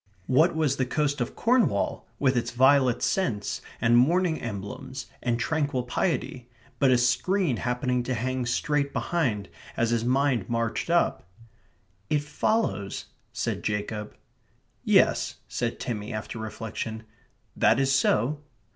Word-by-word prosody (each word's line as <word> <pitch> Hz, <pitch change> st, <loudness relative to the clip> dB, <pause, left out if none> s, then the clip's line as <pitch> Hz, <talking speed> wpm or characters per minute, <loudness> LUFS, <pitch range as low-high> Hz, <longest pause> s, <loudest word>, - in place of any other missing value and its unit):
What 155 Hz, -, +3 dB
was 150 Hz, -4 st, +1 dB
the 130 Hz, -, +1 dB
coast 145 Hz, 0 st, 0 dB
of 120 Hz, -, -3 dB
Cornwall, 235 Hz, -, +1 dB
with 130 Hz, 0 st, +2 dB
its 120 Hz, -, 0 dB
violet 130 Hz, 0 st, +4 dB
scents, 115 Hz, -, -1 dB, 0.2 s
and 120 Hz, +1 st, +3 dB
mourning 165 Hz, +6 st, +3 dB
emblems, 110 Hz, +4 st, -6 dB, 0.2 s
and 120 Hz, -1 st, 0 dB
tranquil 145 Hz, 0 st, 0 dB
piety, 125 Hz, -2 st, -2 dB, 0.3 s
but 135 Hz, -, +4 dB
a 125 Hz, -, +5 dB
screen 130 Hz, -, +1 dB
happening 125 Hz, +1 st, 0 dB
to 130 Hz, -, -1 dB
hang 130 Hz, +1 st, -2 dB
straight 140 Hz, +2 st, 0 dB
behind 125 Hz, -, -1 dB, 0.3 s
as 115 Hz, 0 st, +1 dB
his 115 Hz, -1 st, +1 dB
mind 130 Hz, -3 st, +1 dB
marched 115 Hz, +5 st, -1 dB
up? 170 Hz, -, +1 dB, 0.8 s
"It 150 Hz, -1 st, +1 dB
follows..." 150 Hz, -, -1 dB, 0.3 s
said -, -, -2 dB
Jacob. 105 Hz, 0 st, -3 dB, 0.7 s
"Yes," -, -, +3 dB
said 120 Hz, -1 st, -3 dB
Timmy, 105 Hz, -4 st, -4 dB
after 110 Hz, +1 st, -5 dB
reflection. 110 Hz, 0 st, -5 dB, 0.5 s
"That -, -, +4 dB
is 135 Hz, 0 st, +2 dB
so." 135 Hz, +2 st, +2 dB
125 Hz, 130 wpm, -26 LUFS, 115-145 Hz, 0.8 s, a